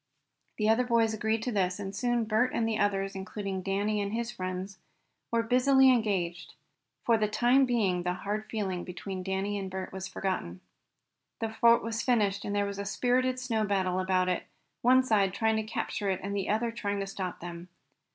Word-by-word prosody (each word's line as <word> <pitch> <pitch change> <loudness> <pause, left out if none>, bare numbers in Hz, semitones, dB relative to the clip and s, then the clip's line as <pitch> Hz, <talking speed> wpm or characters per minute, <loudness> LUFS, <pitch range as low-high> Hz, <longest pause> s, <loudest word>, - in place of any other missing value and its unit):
The 215 - +1
other 225 +3 +4
boys 230 -2 +2
agreed 220 +1 -1
to 250 - -1
this, 185 -3 0
and 195 -1 -5
soon 240 +2 +1
Bert 220 +4 +1
and 225 - +1
the 220 -1 -1
others, 195 -1 0
including 195 0 -4
Danny 205 +2 0
and 200 +1 -3
his 235 +1 -2
friends, 185 -2 -5 0.5
were 230 0 +1
busily 265 +3 +5
engaged. 180 -8 -1 0.5
For 230 -2 +4
the 210 - +2
time 245 +5 +3
being 200 -7 +1
the 180 0 -1
hard 210 +3 -4
feeling 190 -5 -2
between 185 +1 -6
Danny 195 +2 -2
and 190 -1 -4
Bert 185 0 -5
was 190 0 -5
forgotten. 185 - -3 0.8
The 225 - -1
fort 235 +1 +5
was 230 0 -2
finished, 205 -5 +1
and 205 - -3
there 205 0 +2
was 200 0 -5
a - - -2
spirited 255 +4 +1
snow 230 -4 0
battle 190 -3 0
about 185 -1 +1
it, 180 - -1 0.3
one 255 +2 +5
side 200 -6 +2
trying 220 +1 +2
to 220 - 0
capture 210 -1 -3
it 190 - 0
and 200 +1 -3
the 195 - -2
other 230 +2 +1
trying 205 -3 -3
to - - -2
stop 190 -2 -5
them. 175 +1 -8
205 Hz, 195 wpm, -29 LUFS, 190-230 Hz, 0.8 s, busily